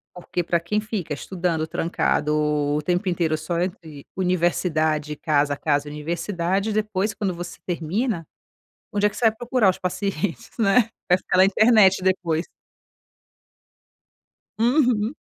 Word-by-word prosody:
Porque 175 0 -3
pra 170 0 +1
quem 210 +6 -1
fica 210 -7 -4
estudando 170 +2 -2
trancado, 160 -2 0
o 150 0 0
tempo 180 +3 0
inteiro 165 -3 0
só 170 +2 -3
entre 170 -6 -5
universidade 160 -4 0
casa, 145 -2 +1
casa 145 -1 0
universidade, 175 +6 -2
depois, 210 -1 -1
quando 195 -3 -2
você 175 0 -7
termina, 175 +3 -2 0.7
onde 205 0 +1
é - - +5
que - - -14
você 240 - -1
vai 225 0 +4
procurar 240 -3 +2
os 185 - 0
pacientes, 195 +2 -3
né. 225 +1 +3 0.2
Vai 180 0 +5
fica 185 - -1
na 185 - +7
internet 200 -1 +5
depois. 175 -3 0 2.1
Uhum. 240 -2 +2
180 Hz, 135 wpm, -23 LUFS, 160-205 Hz, 2.1 s, na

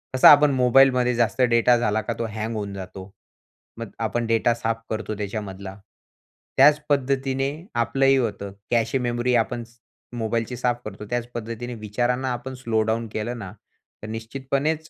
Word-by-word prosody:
कसा 130 - +8
आपण 145 0 +6
मोबाईलमध्ये 125 -1 +4
जास्त 120 +2 +1
डेटा 120 0 +4
झाला 110 -2 0
का, 115 - -3
तो 115 - -1
हँग 110 +1 -3
होऊन 100 -2 -4
जातो. 95 0 -9 0.7
मग 115 -3 -6
आपण 115 +1 -1
डेटा 115 +1 +2
साफ 115 -1 -2
करतो 110 -1 -3
त्याच्यामधला. 100 -2 -5 0.8
त्याच 150 +2 +7
पद्धतीने 135 -1 +1 0.3
आपलंही 135 +4 +3
होतं, 100 -5 -2 0.2
कॅशे 115 +2 +2
मेमोरी 120 0 0
आपण 120 +1 0 0.5
मोबाईलची 115 +2 -2
साफ 120 0 0
करतो, 105 0 -7
त्याच 120 -1 -2
पद्धतीने 120 +2 -5
विचारांना 120 +4 -1
आपण 125 +2 -6
स्लो 115 -3 0
डाउन 115 +1 -1
केलं 120 +3 -3
ना, 95 -4 -7 0.5
तर 105 - -5
निश्चितपणेच 135 +8 -3
120 Hz, 150 wpm, -24 LUFS, 110-130 Hz, 0.8 s, कसा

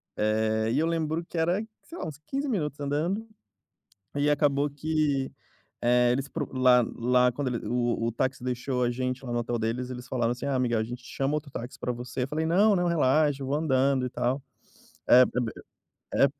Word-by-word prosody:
eh, 110 +1 +1
e 125 - +1
eu 155 - +3
lembro 165 0 -1
que - - -13
era, 175 +6 +1 0.2
sei 335 - -11
lá, - - -4
uns 150 -2 -7
15 275 +2 -2
minutos 150 - -2
andando, 155 +10 -1 0.9
e 145 +1 +2
acabou 145 -1 +2
que, 145 -2 0 0.5
eh, 120 0 +4
eles 135 +2 -2
procu 145 -4 -5
lá 125 -2 +5
lá 125 +1 +3
quando 130 +2 -2
ele 120 - -4
o 120 -1 0
o - - 0
táxi 130 +2 -2
deixou 125 0 -1
a 120 - +1
gente 125 +1 -3
lá 120 - -4
no 120 - +1
hotel 120 0 -2
deles, 115 +3 -2
eles 125 -1 -7
falaram 120 -2 0
assim: 125 +3 -4
"Ah 140 -2 0
Miguel, 120 -3 +1
a - - +1
gente 120 +2 -7
chama 135 +3 -2
outro 150 -1 -5
táxi 120 0 -6
pra 125 - -1
você", 125 +1 -4
eu - - -2
falei: 155 +3 -1
"Não, 200 +6 +4
não, 175 -1 +1
relaxa, 150 -3 +2
eu - - -4
vou 140 - 0
andando, 135 -3 +2
e - - -2
tal". 125 +3 -1 0.7
É 125 - +8
é - - +7 0.2
b 115 -2 -2 0.6
é 140 - +5
perto 140 - -11
130 Hz, 215 wpm, -27 LUFS, 125-150 Hz, 0.9 s, É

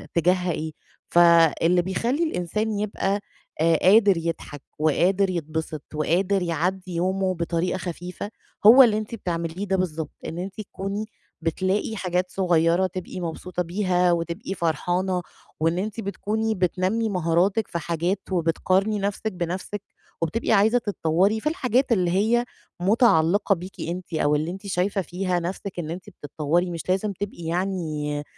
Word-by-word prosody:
تجاهها 180 +1 +2
إيه؟ 160 0 -3 0.4
فاللي 170 0 +5
بيخلّي 230 - 0
الإنسان 215 - -1
يبقى 200 -1 -1 0.4
آآ، 165 0 +4
قادر 200 0 +6
يضحك 165 -3 -4 0.2
وقادر 185 +6 +3
يتبسط 160 -3 -3
وقادر 180 +6 +1
يعدّي 180 +1 -2
يومه 185 +2 0
بطريقة 170 +1 -1
خفيفة 180 +2 -6 0.4
هو 255 +5 +10
اللي 220 -4 +3
أنتِ 215 +1 -4
بتعمليه 170 0 -3
ده 190 0 +1
بالضبط، 165 -4 -2 0.2
إن 165 - -5
أنتِ 195 +3 -5
تكوني 200 +1 -4 0.4
بتلاقي 185 +6 -1
حاجات 180 -1 -1
صغيّرة 175 -1 +2
تبقي 185 0 -6
مبسوطة 175 +2 -3
بيها 180 0 +1
وتبقي 170 +4 -2
فرحانة، 180 +2 0 0.4
وإن 165 +2 +1
أنتِ 215 +4 -3
بتكوني 220 +2 -2
بتنمّي 185 +4 0
مهاراتِك 180 +3 +1
في 170 - -2
حاجات 170 +4 -1
وبتقارني 185 +4 +1
نَفْسِك 205 +2 -2
بنَفْسِك، 180 +3 -4 0.4
وبتبقي 165 +10 -1
عايزة 220 +3 +5
تتطوّري 200 0 +1
في 300 - 0
الحاجات 260 -4 +1
اللي 180 -6 +2
هي 225 +6 +2 0.3
متعلقة 200 -1 +3
بيكِ 185 +2 -9
أنتِ 175 +1 -5
أو 150 -2 +2
اللي 155 +3 -1
أنتِ 195 +2 -8
شايفة 195 +2 0
فيها 180 +1 -1
نَفْسِك 180 +2 -5
إن 160 -2 -4
أنتِ 180 +1 -7
بتتطوّري 155 +5 -1
مش 170 +1 -6
لازم 195 +2 +1
تبقي 195 -2 -6
يعني 160 -4 -2
185 Hz, 140 wpm, -24 LUFS, 170-200 Hz, 0.4 s, هو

